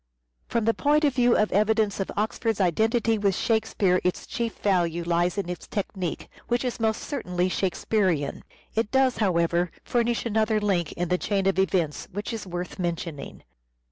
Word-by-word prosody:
From 230 -2 0
the 230 - +3
point 295 +4 +2
of 285 -3 +3
view 245 -2 +4
of 215 - +2
evidence 210 0 +2
of 195 - -2
Oxford's 220 +1 -1
identity 220 +5 +2
with 200 -2 +2
Shakespeare 220 -5 +1
its 180 - -1
chief 230 -2 -3
value 175 -4 +1
lies 175 +2 +1
in 200 - -1
its 180 -1 -6
technique, 190 -4 -4 0.2
which 240 +1 0
is 250 -1 -2
most 220 -1 0
certainly 180 -10 -1
Shakespearean. 185 -5 0 0.3
It 220 -1 0
does, 265 0 +3
how 190 -6 +2
ever, 170 +1 +1
furnish 235 0 0
another 220 -1 +2
link 185 -6 0
in 175 -1 -3
the 180 0 +1
chain 200 -2 0
of 195 -1 +2
evidence 175 -5 0
which 205 +5 -4
is 220 -3 -5
worth 180 +1 -5
mentioning. 170 -5 -4
200 Hz, 170 wpm, -26 LUFS, 180-225 Hz, 0.3 s, view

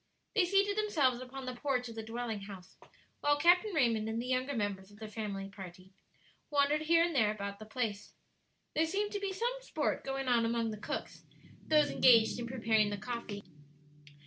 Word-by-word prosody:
They 420 -5 +4
seated 400 +2 +2
themselves 290 - +2
upon 260 +1 -7
the 255 - -4
porch 250 -1 -1
of 230 - -8
the 225 - -5
dwelling 225 -1 -4
house, 195 -2 -10 0.4
while 290 0 +2
Captain 355 +7 +4
Raymond 230 - +2
and 225 +1 -2
the 240 - -3
younger 255 +2 0
members 200 -3 -2
of 205 - -16
their 220 0 -7
family 210 -3 -4
party 190 -1 -11 0.6
wandered 290 +1 +2
here 330 +2 +4
and 340 0 0
there 220 -6 +4
about 200 -1 -4
the 215 - -10
place. 220 -3 -3 0.6
There 320 +1 +2
seemed 410 +4 -1
to 410 - -2
be 400 -1 -2
some 470 +6 -1
sport - - -2
going 270 0 -3
on 240 -2 +3
among 230 -1 0
the 215 - -6
cooks - - -5 0.4
those 300 -2 +4
engaged 230 -2 +5
in 235 - -4
preparing 220 -4 +2
the 205 - -3
coffee. 215 -1 -5
240 Hz, 190 wpm, -33 LUFS, 215-300 Hz, 0.6 s, engaged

